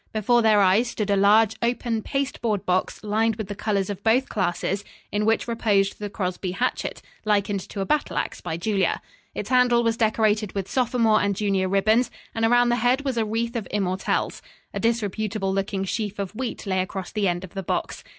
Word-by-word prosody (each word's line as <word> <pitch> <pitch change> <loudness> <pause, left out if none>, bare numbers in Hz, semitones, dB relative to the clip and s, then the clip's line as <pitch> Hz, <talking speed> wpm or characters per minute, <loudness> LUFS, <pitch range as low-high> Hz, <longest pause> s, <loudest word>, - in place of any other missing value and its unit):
Before 230 +3 +3
their 215 -2 +5
eyes 195 +6 +4
stood 210 -3 -2
a - - +4
large, 210 +2 +4
open 235 -1 0
paste 275 +4 -3
board 215 -4 -1
box 185 +3 -1
lined 220 +1 +1
with 215 -2 -6
the - - -2
colors 200 -2 -1
of 200 -1 -5
both 245 +4 +3
classes, 190 0 -1 0.3
in 210 +1 0
which 225 +2 +2
reposed 205 -4 +1
the 205 -1 -4
Crosby 185 -2 -3
hatchet, 245 +6 -2 0.2
likened 205 -1 +1
to 200 - -4
a - - -1
battle 300 +5 0
ax - - -3
by 160 - -4
Julia. 195 +2 0 0.4
Its - - -4
handle 250 -2 +4
was 230 -1 +1
decorated 215 -2 +1
with 195 -2 -3
sophomore 230 -2 +2
and 200 -1 0
junior 195 -2 0
ribbons, 215 +5 +3 0.2
and 225 - -2
around 245 +1 +4
the 240 - +2
head 250 +4 +1
was 265 -2 -1
a 225 -2 +1
wreath 230 +2 -2
of 225 -4 -3
immortelles. 190 -2 -1 0.3
A - - -3
disreputable 215 -3 -1
looking 195 0 -1
sheaf 205 +1 -3
of 200 -2 -3
wheat 245 0 -5
lay 190 -1 0
across 190 0 -5
the 210 -2 0
end 175 0 -1
of 185 - -10
the 195 - -3
box. 185 - -3
210 Hz, 200 wpm, -24 LUFS, 195-230 Hz, 0.4 s, their